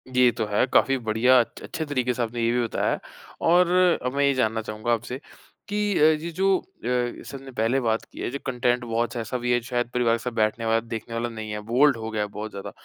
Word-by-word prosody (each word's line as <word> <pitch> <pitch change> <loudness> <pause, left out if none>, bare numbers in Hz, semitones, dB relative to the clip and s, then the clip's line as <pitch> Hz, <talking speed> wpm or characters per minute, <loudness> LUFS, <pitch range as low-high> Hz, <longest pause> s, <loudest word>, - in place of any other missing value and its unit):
ये 125 -1 +6
तो 115 -1 -2
है। 105 +3 +2
काफ़ी 135 0 +4
बढ़िया, 120 +2 +4
अछ 120 - -2
अच्छे 160 - -4
तरीके 130 -4 0
से 120 - -3
आपने 115 +1 -3
ये 115 - +2
भी 120 0 +1
बताया 115 - 0
है - - -1 0.5
और 180 +1 +5 0.4
अब 125 - -1
मैं 140 - +2
ये 140 - +3
जानना 110 -3 0
चाहूँगा 110 +2 -2
आपसे 120 +2 -3 0.5
कि 205 -1 0
अ, - - +4
ये 155 +1 +3
जो 190 +3 +2
अ, - - -17 0.2
जैसे 125 +2 -2
हमने 135 0 -11
पहले 115 +2 +1
बात 115 -3 0
की - - -12
है, - - -2
जो 140 - -4
कंटेंट 125 -1 0
बहुत-सा 120 +1 -1
ऐसा 115 +3 -3
भी 120 0 -1
है, 120 - +3
जो 115 - -14
शायद 120 -2 -1
परिवार 120 -2 +2
के - - -13
साथ 125 - -2
बैठने 110 0 0
वाला, 115 0 +3
देखने 115 0 -7
वाला 120 +1 -1
नहीं 110 -2 -6
है, 105 - -3
बोल्ड 135 +1 +5
हो 110 0 -5
गया 110 - -1
है 105 - -1
बहुत 105 +1 -7
ज़्यादा। 100 - -7
120 Hz, 255 wpm, -25 LUFS, 115-130 Hz, 0.5 s, ये